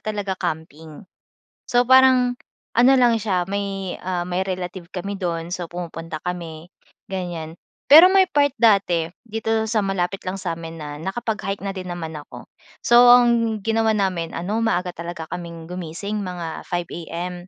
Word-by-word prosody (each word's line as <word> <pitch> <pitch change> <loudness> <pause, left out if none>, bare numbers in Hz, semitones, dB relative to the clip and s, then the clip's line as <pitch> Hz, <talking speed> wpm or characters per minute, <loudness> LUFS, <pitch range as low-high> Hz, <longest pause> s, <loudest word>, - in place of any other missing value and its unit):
talaga, 205 -2 -3
camping. 160 -1 -6 0.6
So, 245 -1 +3
parang 255 -1 +5 0.3
ano 245 +3 +5
lang 240 -3 +4
siya 190 -4 0
may, 195 -1 -4
ah, 180 -1 -2
may 180 +2 -2
relative 180 -1 -5
kami 195 +2 -4
do'n 170 -2 -3
so 180 -2 -4
pumupunta 165 -2 -7
kami 170 -2 -6 0.4
ganyan. 170 -3 -5 0.3
Pero 320 +5 +11
may 380 0 +4
part 285 -2 +2
dati 195 -7 +3 0.2
dito 225 0 -1
sa 215 -2 +1
malapit 195 0 -2
lang 185 +1 -4
sa'min 165 -2 -5
na 150 -1 -6
nakapag-hike 210 -1 -3
na 195 - -4
din 185 -1 -6
naman 165 -2 -6
ako. 150 - -10 0.3
So, 240 0 +6
ang 235 -3 +4
ginawa 225 +2 +1
namin 190 -6 -1
ano 210 +6 -2
maaga 180 -5 -1
talaga 170 -1 -6
kaming 170 -1 -7
gumising, 180 +3 -5
mga 175 -3 -6
5:00 175 -1 -5
AM, 175 +2 -4
185 Hz, 150 wpm, -22 LUFS, 170-220 Hz, 0.6 s, Pero